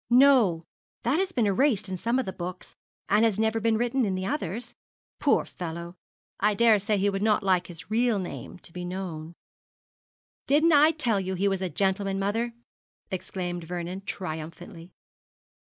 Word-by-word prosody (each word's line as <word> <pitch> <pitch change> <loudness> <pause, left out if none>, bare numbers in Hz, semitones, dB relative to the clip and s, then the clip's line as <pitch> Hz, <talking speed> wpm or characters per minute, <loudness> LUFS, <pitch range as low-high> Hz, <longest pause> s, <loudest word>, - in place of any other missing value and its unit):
'No; 240 - +5 0.4
that 260 +7 +2
has 380 -1 0
been 240 -9 +1
erased 210 0 +2
in 190 - -3
some 230 +7 0
of 260 - 0
the 190 - -4
books, 180 +1 -7 0.3
and 210 +3 +4
has 220 -3 +2
never 220 +1 +1
been 225 0 +2
written 245 +3 +1
in 195 -4 0
the 185 0 -3
others. 235 - -3 0.5
Poor - - +3
fellow! 170 0 -6 0.4
I 210 +1 +2
daresay 215 -1 +4
he 200 +1 +2
would 195 0 -3
not 210 -1 +2
like 185 -2 +2
his 175 +3 -10
real 235 0 +3
name 185 -1 -6
to 170 - -12
be 180 - -5
known.' 175 -3 -5 1.1
'Didn't 310 +4 +4
I 300 +1 +7
tell 245 -10 0
you 190 0 -3
he 195 +3 +1
was 195 -1 0
a 185 - -1
gentleman, 195 +3 0
mother?' 225 +4 -1 0.6
exclaimed 175 -2 -4
Vernon, 180 +2 -4
triumphantly. 165 0 -6
195 Hz, 170 wpm, -27 LUFS, 180-230 Hz, 1.1 s, I